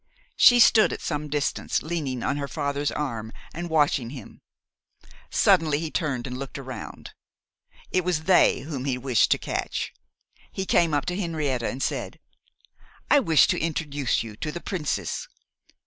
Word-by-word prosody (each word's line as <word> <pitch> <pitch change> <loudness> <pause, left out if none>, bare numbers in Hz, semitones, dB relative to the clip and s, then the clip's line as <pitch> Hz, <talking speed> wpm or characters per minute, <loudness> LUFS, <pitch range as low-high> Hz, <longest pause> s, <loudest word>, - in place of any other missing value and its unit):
She 245 -1 +7
stood 230 -2 +6
at - - -4
some 150 0 -3
distance 145 0 -1
leaning 145 -7 -3
on - - 0
her 140 -1 -3
father's 145 +1 -2
arm, 115 -7 -4 0.2
and 175 +1 -5
watching 145 -6 +2
him. 125 -4 -11 0.9
Suddenly 165 -7 +3
he 160 0 -4
turned 140 -8 -2
and 125 0 -5
looked 135 0 -6
around. 130 -2 -8 0.8
It 185 - +1
was 175 -3 -1
they 185 +1 +4
whom 140 -3 -5
he 130 -3 0
wished 125 -3 +2
to - - +4
catch. - - -3 0.6
He 190 - -4
came 165 -4 +3
up 145 - 0
to 180 - -2
Henrietta 155 - -1
and 130 - -4
said, - - -3 0.9
'I 290 - +7
wish 165 - +5
to - - +1
introduce 145 -6 -1
you 110 -2 -9
to 150 - -4
the 175 - -6
Princess 170 -5 -3
145 Hz, 160 wpm, -25 LUFS, 135-165 Hz, 0.9 s, She